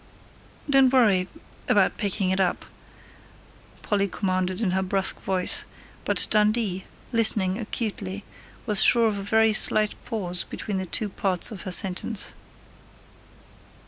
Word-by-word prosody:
"Don't 270 -2 +4
worry 205 -8 +3 0.4
about - - +2
picking 195 -2 -1
it 190 - -1
up," 185 - -1 1.2
Polly 200 -2 0
commanded 185 -1 -2
in 210 -5 0
her 190 +1 0
brusque 190 0 -1
voice, 185 -1 +1 0.4
but - - +2
Dundee, 210 -3 +1 0.3
listening 215 -4 +2
acutely, 205 -3 -5 0.4
was 210 -4 +4
sure 235 -1 +6
of 205 -2 -2
a - - -5
very 220 +2 +2
slight 215 0 +2
pause 180 -5 -2
between 200 -3 -5
the 190 - -5
two 215 - -1
parts 190 -1 -1
of 200 -5 -8
her - - -5
sentence. 190 +3 0
200 Hz, 130 wpm, -24 LUFS, 185-220 Hz, 1.2 s, sure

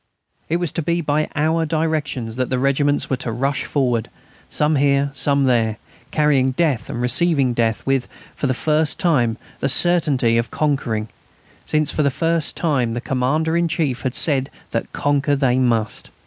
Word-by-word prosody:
It 165 - +1
was 175 -4 -2
to - - -2
be 170 +3 0
by 150 0 0
our 160 +2 +1
directions 155 -7 -2
that 130 -1 -1
the 130 - 0
regiments 140 +2 +1
were 130 - -1
to 120 - -4
rush 135 +5 -1
forward, 125 -5 0 0.4
some 150 0 +2
here, 140 0 +2
some 140 0 +1
there, 115 -4 +1 0.3
carrying 140 -4 +2
death 145 -6 0
and - - -4
receiving 130 +1 +2
death 115 -2 -1
with, 135 -2 0 0.3
for 140 - -2
the 130 - 0
first 155 +2 0
time, 120 -10 +1 0.2
the - - 0
certainty 135 -7 +3
of 115 - -2
conquering; 120 -8 -1 0.6
since 155 -1 +1
for - - -1
the 140 - +3
first 165 +3 -1
time 130 -8 0
the - - -2
Commander 135 +7 0
in 170 0 +2
Chief 155 -6 -1
had 130 -2 -3
said 135 -4 +2 0.2
that - - -3
conquer 145 0 +1
they 130 -2 +2
must. 115 -4 0
140 Hz, 175 wpm, -20 LUFS, 125-155 Hz, 0.6 s, certainty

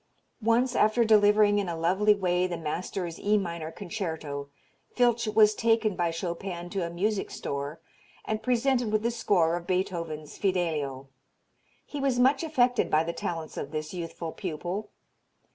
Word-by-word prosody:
Once 240 +3 +2
after 215 +2 +3
delivering 210 -1 +5
in 195 -3 -2
a 170 - -3
lovely 190 +6 +3
way 180 -2 +1
the 175 -2 -4
master's 170 +2 -4
E 210 +1 +2
minor 170 -4 -3
concerto 160 -8 -5 0.5
Filtsch 240 -2 +3
was 215 -1 +6
taken 225 -2 +2
by 175 -1 +1
Chopin 175 +1 -5
to 195 -3 -1
a 170 - -3
music 195 +4 -1
store 140 +3 -4 0.5
and 215 0 -2
presented 250 -1 +1
with 215 0 +1
the 235 - +1
score 175 -8 +2
of 175 0 -6
Beethoven's 165 -5 -3
"Fidelio." 155 -8 -1 0.8
He 290 - -6
was 270 -3 +1
much 265 +4 +4
affected 250 -6 +2
by 155 +1 +3
the 170 +1 -3
talents 165 -2 -5
of 140 - -4
this 155 +1 -5
youthful 165 -2 -5
pupil. 185 +4 -4
185 Hz, 155 wpm, -28 LUFS, 165-215 Hz, 0.8 s, was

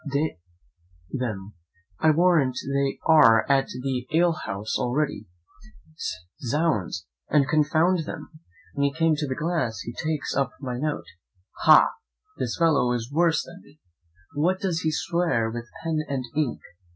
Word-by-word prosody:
d 145 +3 0 0.8
n 135 - -2
them, 105 -5 -4 0.5
I 160 - +4
warrant 155 -6 +3 0.2
they 140 0 0
are 115 -9 +6
at 135 -1 +3
the 125 0 -4
alehouse 155 - 0
already! 140 +5 -1 1.1
zounds! 120 - -1 0.2
and 140 -3 +3
confound 160 +3 +2
them!' - - -7 0.4
When 140 - -1
he 140 - 0
came 160 0 +2
to 150 -1 -2
the 130 - -2
glass 155 -9 -1
he 120 - -6
takes 155 +1 -3
up 140 -1 0
my 125 -3 -4
note 150 +1 -2 0.6
'Ha! - - +9 0.5
this 115 - -2
fellow 155 -7 +3
is 120 +1 -4
worse 165 +1 +3
than 175 +2 -13
me: 145 +2 -21 0.5
what, 175 +6 +1
does 180 -4 -1
he 160 - 0
swear 160 -9 0
with 120 0 -6
pen 165 -2 0
and 135 -2 -2
ink?' 150 -5 -1
145 Hz, 145 wpm, -25 LUFS, 125-160 Hz, 1.1 s, Ha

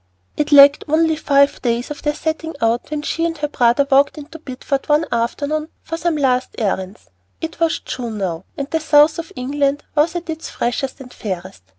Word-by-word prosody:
It 300 0 -1
lacked 285 0 +8
only 320 +1 +2
five 280 -2 +2
days 240 +2 -1
of 295 - -6
their 295 0 -1
setting 320 0 -3
out 230 +1 0
when 300 -1 -3
she 330 - -2
and 335 -1 -1
her 295 0 -1
brother 245 -1 +2
walked 275 +3 +4
into 305 +2 -10
Bideford 275 0 -4
one 300 +2 +3
afternoon 285 +7 -1
for 330 - -4
some 335 0 -1
last 255 -3 0
errands. 190 - -3 0.3
It 325 +1 -6
was 330 -1 +2
June 235 -4 -5
now, 180 -3 -3
and 280 - -3
the 320 - +1
south 305 0 +4
of 330 - -7
England 280 +2 -1
was 315 +2 +2
at 345 0 -4
its 320 -1 -5
freshest 260 +3 -3
and 250 -1 -11
fairest. 185 - -6
285 Hz, 195 wpm, -19 LUFS, 245-315 Hz, 0.3 s, lacked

